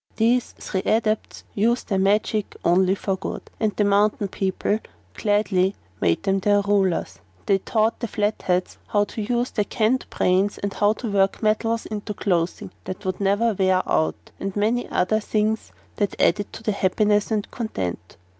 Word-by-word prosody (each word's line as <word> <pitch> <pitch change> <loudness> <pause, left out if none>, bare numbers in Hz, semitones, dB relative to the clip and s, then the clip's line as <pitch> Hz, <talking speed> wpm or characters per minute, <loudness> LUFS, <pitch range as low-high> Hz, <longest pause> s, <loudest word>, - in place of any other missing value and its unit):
These 235 +2 +2
three 190 - -3
Adepts 220 0 0
used 235 +4 +1
their 195 -3 +1
magic 210 +2 +1
only 185 +2 +4
for 195 -1 -1
good, - - -5 0.2
and 215 -3 0
the 210 - +2
mountain 205 0 +2
people 195 +2 -1 0.3
gladly 205 -3 +1 0.3
made 85 -1 +2
them 195 0 +1
their 205 +1 +3
rulers. 190 - 0 0.3
They 195 -1 +3
taught 220 +3 0
the 235 - -2
Flatheads 205 -4 -1
how 205 -1 +2
to 210 +2 -5
use 240 +3 -1
their 210 - +1
canned 235 +4 0
brains 190 +3 +1
and 200 0 -3
how 205 0 +3
to 225 0 -5
work 195 +2 +1
metals 225 +1 +1
into 210 0 -5
clothing 180 -3 -1
that 185 +2 -6
would 185 +1 -2
never 205 +4 +2
wear 185 -1 +2
out, 160 - 0
and 195 -1 -4
many 220 +4 0
other 215 +4 +1
things 215 0 -1 0.3
that 205 -2 -1
added 205 -1 +2
to - - -9
their 215 - 0
happiness 205 +2 +2
and 215 -2 -2
content. 90 - -4
205 Hz, 165 wpm, -23 LUFS, 190-215 Hz, 0.3 s, only